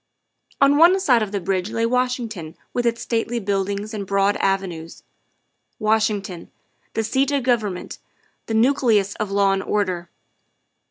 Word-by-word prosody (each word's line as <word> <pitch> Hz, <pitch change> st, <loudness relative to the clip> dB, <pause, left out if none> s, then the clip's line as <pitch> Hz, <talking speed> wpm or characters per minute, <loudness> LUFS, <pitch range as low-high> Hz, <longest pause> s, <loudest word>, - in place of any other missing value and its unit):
On 275 Hz, +1 st, +5 dB
one 345 Hz, +5 st, +6 dB
side 255 Hz, -11 st, +3 dB
of 210 Hz, -2 st, -2 dB
the 205 Hz, -, -1 dB
bridge 185 Hz, +1 st, -1 dB
lay 230 Hz, 0 st, 0 dB
Washington 235 Hz, -9 st, -2 dB, 0.2 s
with 245 Hz, -1 st, 0 dB
its 230 Hz, 0 st, -1 dB
stately 235 Hz, 0 st, -1 dB
buildings 200 Hz, +1 st, -2 dB
and 200 Hz, -3 st, -5 dB
broad 200 Hz, +1 st, +2 dB
avenues 180 Hz, -4 st, -2 dB, 0.7 s
Washington, 215 Hz, -5 st, 0 dB, 0.5 s
the 225 Hz, -, 0 dB
seat 265 Hz, +5 st, +1 dB
of 280 Hz, -2 st, 0 dB
govern 225 Hz, -6 st, +1 dB
ment, -, -, -9 dB, 0.5 s
the 225 Hz, -, -2 dB
nucleus 225 Hz, -5 st, +3 dB
of 215 Hz, -3 st, -2 dB
law 200 Hz, 0 st, +3 dB
and 195 Hz, 0 st, 0 dB
order. 185 Hz, -4 st, -2 dB
215 Hz, 150 wpm, -22 LUFS, 195-240 Hz, 0.7 s, one